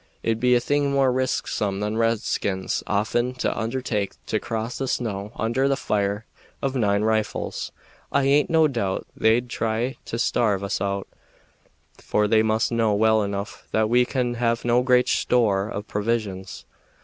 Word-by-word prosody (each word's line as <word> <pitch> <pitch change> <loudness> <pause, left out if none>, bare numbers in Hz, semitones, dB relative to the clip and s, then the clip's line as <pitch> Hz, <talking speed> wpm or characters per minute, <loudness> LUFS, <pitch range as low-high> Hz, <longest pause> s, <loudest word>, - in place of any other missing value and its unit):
It'd 115 -1 0
be 125 +1 +4
a - - +4
thing 145 +2 +1
more 135 -2 +3
risksome 110 -6 -1
than 105 +1 -2
redskins 110 -4 0
often 120 +5 0
undertake 115 -4 -1
to 110 - -1
cross 115 +2 -4
the 135 - -2
snow 105 -5 -2
under 120 +4 +1
the 140 - +2
fire 105 -3 -1 0.3
of 135 -1 -2
nine 100 -4 +2
rifles. 110 -1 -1 0.4
I 140 - +2
aint 140 +2 +3
no 160 -1 +5
doubt 110 -9 -2
they'd 115 +2 +2
try 115 +2 -2
and 115 - -2
starve 105 -5 +1
us 100 0 -2
out, 100 -1 -2 0.9
for 105 0 +1
they 110 +1 +4
must 110 +1 +1
know 115 -3 +2
well 110 +1 +4
enough 100 +2 -5
that 110 0 +2
we 125 +1 +5
can 125 -1 -1
have 115 -1 0
no 120 +1 +3
great 125 -1 +3
store 105 -5 +2
of 105 -1 -5
provisions. 105 -4 -3
115 Hz, 160 wpm, -24 LUFS, 105-125 Hz, 0.9 s, no